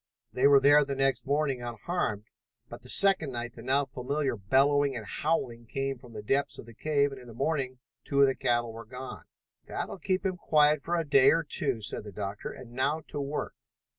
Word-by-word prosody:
They 130 +2 +4
were 140 -1 +7
there 145 +2 +6
the 140 -1 -3
next 135 0 0
morning 140 -3 0
unharmed, 120 - -3 0.5
but 120 +1 -9
the 125 - -9
second 185 -8 +4
night 120 0 -5
the 115 - -11
now 135 +4 +1
familiar 135 +1 -2
bellowing 135 +6 +2
and 115 -3 -6
howling 120 -5 -2
came 135 +1 -3
from 120 -1 -14
the 105 -1 -7
depths 135 +6 0
of - - -10
the 115 - -13
cave 145 +3 +1
and 135 -1 -9
in 125 - -14
the 115 - -11
morning 135 -1 -1 0.3
two 140 - -1
of - - +8
the 135 - +2
cattle 120 -2 0
were 115 +1 -8
gone. 125 +4 -9 0.4
"That - - -3
will - - -8
keep 185 +2 -1
him 185 -1 -1
quiet 150 -3 +3
for 170 +4 -2
a 165 -1 0
day 135 -1 +6
or 165 0 +3
two," 140 -6 -2
said 105 - -2
the 105 - -9
doctor, 100 +1 -5
"and 125 -2 -11
now 140 +6 0
to 145 - -3
work!" 140 +2 -3
135 Hz, 220 wpm, -29 LUFS, 120-145 Hz, 0.5 s, of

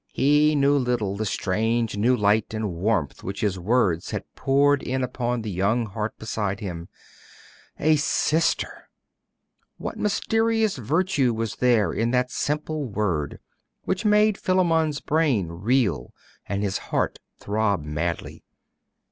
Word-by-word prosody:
He 150 +2 +3
little 125 -7 +2
knew - - -4
the 110 +1 -2
strange 110 +4 0
new 120 +5 +2
light 105 +1 +1
and 110 -4 -2
warmth 90 -3 -1
which 100 +3 -5
his 100 -4 0
words 95 -4 +1
had - - -3
poured 140 +1 +3
in 130 +1 -2
upon 125 -2 -2
the 110 - -4
young 100 +6 +1
heart 105 +1 -4
beside 105 -2 -3
him. 85 -5 -6 0.9
'A 155 +1 +3
sister!' 160 +3 0 0.9
What - - -6
mysterious 225 0 +1
virtue 140 - +1
was 115 -1 -3
there 115 -8 +3
in 115 +1 0
that 125 +1 +1
simple 150 +1 -2
word, 100 - -2 0.5
which 190 +3 -2
made 210 -1 +3
Philammon's 165 -5 +1
brain 145 - +1
reel 100 - 0 0.3
and 100 +1 -2
his 95 -2 -1
heart - - -1 0.2
throb 105 -4 0
madly? 80 +3 -4
115 Hz, 130 wpm, -24 LUFS, 100-145 Hz, 0.9 s, He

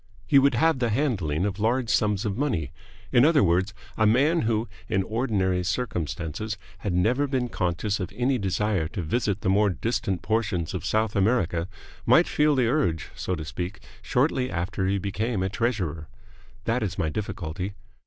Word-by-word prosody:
He 140 - +6
would 135 -2 +3
have 160 +2 +3
the 120 -2 +1
handling 100 - 0
of 100 -1 -3
large 120 +3 +1
sums 105 0 +1
of 100 -2 -1
money. 115 - -1 0.4
In 120 - +5
other 155 -1 +5
words, 90 +2 +2 0.3
a 110 - +4
man 145 +10 +3
who 110 0 0 0.2
in 95 -3 +1
ordinary 95 -5 0
circumstances 90 - -3 0.2
had 100 - -2
never 115 +11 +2
been 130 -3 -1
conscious 95 +2 -1
of 95 - -3
any 125 +1 +1
desire 100 -3 0
to 95 0 -5
visit 105 +3 -1
the - - -2
more 100 +2 +4
distant 100 -1 -2
portions 95 -7 -1
of - - -4
South 110 -1 +1
America 95 -5 +1 0.4
might - - +5
feel 150 0 +3
the 130 -2 +3
urge, 115 - 0
so 90 - -3
to 80 -2 -6
speak, 90 +4 -5 0.2
shortly 130 -1 +1
after 95 +2 -2
he 100 +1 +1
became 100 +2 -1
a 95 - 0
treasurer. 95 -9 -2 0.6
That 115 +2 +1
is 95 -6 -2
my 80 - 0
difficulty. 95 0 -4
105 Hz, 175 wpm, -26 LUFS, 90-120 Hz, 0.6 s, He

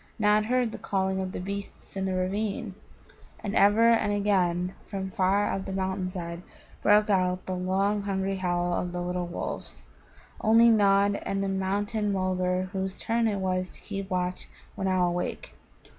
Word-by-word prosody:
Nod 210 -1 +3
heard 250 -1 +1
the - - -7
calling 190 -1 -1
of 190 -1 -3
the - - -5
beasts 200 +2 -7
in 195 -1 -1
the 190 -1 -1
ravine, 200 +2 -2 0.7
and 205 - -3
ever 220 +3 +5
and 215 -3 +2
again 185 -3 +1
from 190 -2 -4
far 200 0 +2
up 195 - -3
the - - -4
mountain 190 -1 -2
side 170 -2 -6 0.4
broke 210 0 +4
out 185 -1 +1
the 185 - -3
long 195 +3 +1
hungry 195 -1 -1
howl 175 -1 0
of 175 0 -2
the 175 - -2
little 180 0 -2
wolves. 65 - -6 0.6
Only 230 +2 +6
Nod 200 -1 +4
and 195 0 -1
the - - -1
Mountain 205 +2 -1
mulgar 185 -1 0
whose 190 0 -3
turn 230 0 0
it 205 -2 0
was 185 -1 -1
to - - -14
keep 195 -2 -5
watch 180 -1 -2 0.3
were 190 - -3
now 185 -1 +2
awake. 175 0 -3
190 Hz, 175 wpm, -27 LUFS, 185-205 Hz, 0.7 s, Only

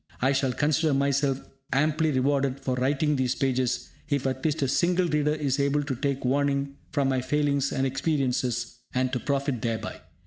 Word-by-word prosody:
I 130 +2 +3
shall 135 -1 +1
consider 150 +2 +1
myself 140 -1 +1 0.3
amply 155 +3 +2
rewarded 135 0 +1
for 135 -1 -2
writing 140 +4 +1
these 130 -1 +1
pages 130 -2 0 0.2
if 140 -2 0
at 130 0 -2
least 155 -1 +1
a - - +2
single 175 +6 +2
reader 150 -1 +1
is 145 -3 -1
able 140 +1 +2
to 140 -1 -2
take 140 +1 -2
warning 140 +1 +1 0.2
from 140 -2 +1
my 130 -1 +1
failings 140 0 +1
and 135 -1 0
experiences, 130 -4 -1 0.2
and 130 0 +1
to 125 - +1
profit 140 -3 -1
thereby. 115 -2 -3
140 Hz, 175 wpm, -27 LUFS, 130-145 Hz, 0.3 s, I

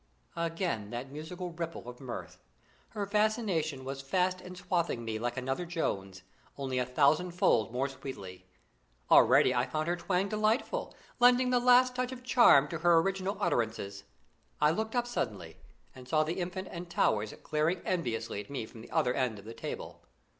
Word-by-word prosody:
Again 165 - -2
that 125 +3 -6
musical 175 +5 -6
ripple 165 -5 -6
of 125 0 -9
mirth. 90 -8 -7 0.5
Her 205 -2 -3
fascination 200 - 0
was 135 0 -5
fast 185 +6 0
enswathing 180 -8 -2
me 110 -1 -3
like 120 +2 -3
another 135 +6 -2
Jones, 95 - -3 0.3
only 130 -2 -2
a 125 - -1
thousandfold 155 - +2
more 130 +3 0
sweetly. 100 -9 -9 0.6
Already 130 - +6
I 125 +1 +1
found 155 +5 -2
her 175 - +1
twang 180 +2 0
delightful, 215 - 0 0.2
lending 250 +1 +5
the 250 - +4
last 250 +1 +5
touch 255 0 -1
of 255 -1 -8
charm 235 - +6
to 165 - -4
her 170 0 +5
original 195 +3 0
utterances. 100 -4 -1 0.6
I 150 0 +4
looked 220 +7 -2
up 240 -1 +2
suddenly, 105 - -4 0.4
and 130 -1 -12
saw 155 +3 +3
the 165 +4 -3
Infant 185 +1 -4
and 175 0 -7
Towers 110 -9 +1
glaring 155 +4 +1
enviously 115 - -2
at 105 - -14
me 135 -5 -4
from 110 0 -13
the 115 - -12
other 125 - +1
end 125 -5 -1
of 100 - -12
the 115 - -8
table. - - -7
155 Hz, 170 wpm, -31 LUFS, 125-185 Hz, 0.6 s, Already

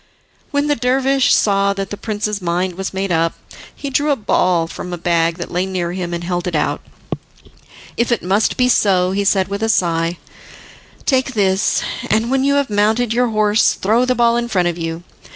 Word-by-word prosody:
When 285 0 0
the 295 0 +1
dervish 265 +2 +2
saw 200 -1 +3
that 195 0 -5
the - - -3
prince's 210 -1 -3
mind 180 +1 -1
was 190 +2 -4
made 195 0 -3
up, 165 0 +1 0.4
he 280 - -6
drew 290 +3 +1
a 285 - +3
ball 180 -7 +1
from 180 +2 -7
a 175 - -3
bag 170 -1 +1
that 170 - -6
lay 180 +2 -1
near 180 -2 -2
him, 180 -1 -4
and 170 0 -4
held 175 0 -2
it 175 - -2
out. - - 0 1.2
"If 235 +1 0
it 235 - 0
must 195 +4 +1
be 250 - +3
so," 185 -6 +3
he 200 +1 0
said, 195 -1 +2
with 200 +1 -4
a 225 - 0
sigh, 170 -4 +1 0.9
"take 260 -2 +1
this, 195 -1 +1 0.3
and 220 +3 +1
when 265 0 +2
you 280 +1 +2
have 280 -5 0
mounted 220 +3 +1
your 245 +1 +2
horse 215 0 +2
throw 220 +5 +2
the 255 0 +1
ball 235 0 +3
in 240 0 -1
front 180 -6 +1
of 170 - -3
you. 165 0 -5
200 Hz, 205 wpm, -18 LUFS, 180-235 Hz, 1.2 s, saw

